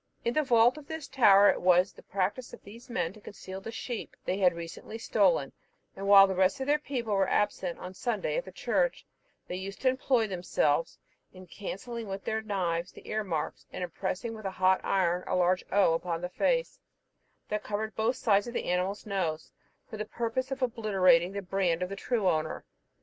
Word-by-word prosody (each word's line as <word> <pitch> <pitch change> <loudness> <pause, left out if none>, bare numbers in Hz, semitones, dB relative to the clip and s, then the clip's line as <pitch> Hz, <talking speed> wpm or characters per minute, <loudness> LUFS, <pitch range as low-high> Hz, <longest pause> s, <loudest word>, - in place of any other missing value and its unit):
In 235 - +1
the 305 - +3
vault 245 0 +4
of 285 - -15
this 320 -2 -6
tower 205 -6 +6
it - - -4
was 180 +1 +4
the - - -15
practice 200 +6 -2
of - - -11
these 230 +5 -13
men 190 -8 -1
to 215 - -15
conceal 190 -1 -9
the 225 - -7
sheep 230 0 -6
they 190 - -1
had 180 -3 +4
recently 170 +6 -7
stolen; 185 -11 +2 0.4
and 195 +1 -5
while 200 -1 +9
the 190 - -1
rest 190 +7 +2
of 265 - -2
their 295 +2 +2
people 250 -7 -3
were 195 -1 +2
absent 190 -4 0
on 180 - -8
Sunday 215 +1 -2
at - - -1
the - - -10
church, - - 0 0.4
they - - -4
used 195 +1 -7
to 260 - +4
employ 255 -2 +1
themselves 175 -5 0 0.4
in 185 0 -12
cancelling 215 +5 -6
with 195 0 -5
their 220 0 -1
knives 180 -5 -2
the - - -15
ear 215 0 -1
marks, 165 -6 -4
and - - -5
impressing 190 +6 -3
with 215 -2 -9
a - - 0
hot 185 0 +2
iron 180 -2 +1
a - - 0
large 180 0 +2
O 195 -4 +4
upon 165 0 -2
the 180 - -3
face, - - 0 0.7
that 210 0 -1
covered 220 +1 -3
both 225 +3 +1
sides 205 -4 +2
of 240 - -7
the - - -2
animal's 185 +3 -1
nose, 175 -6 -2 0.4
for 220 - -8
the 215 - -3
purpose 235 +4 -2
of 270 -1 -3
obliterating 190 -7 +3
the 200 0 -4
brand 180 -2 0
of 180 - -3
the 195 - -5
true 215 0 -1
owner. 155 -2 -1
200 Hz, 205 wpm, -29 LUFS, 180-230 Hz, 0.7 s, while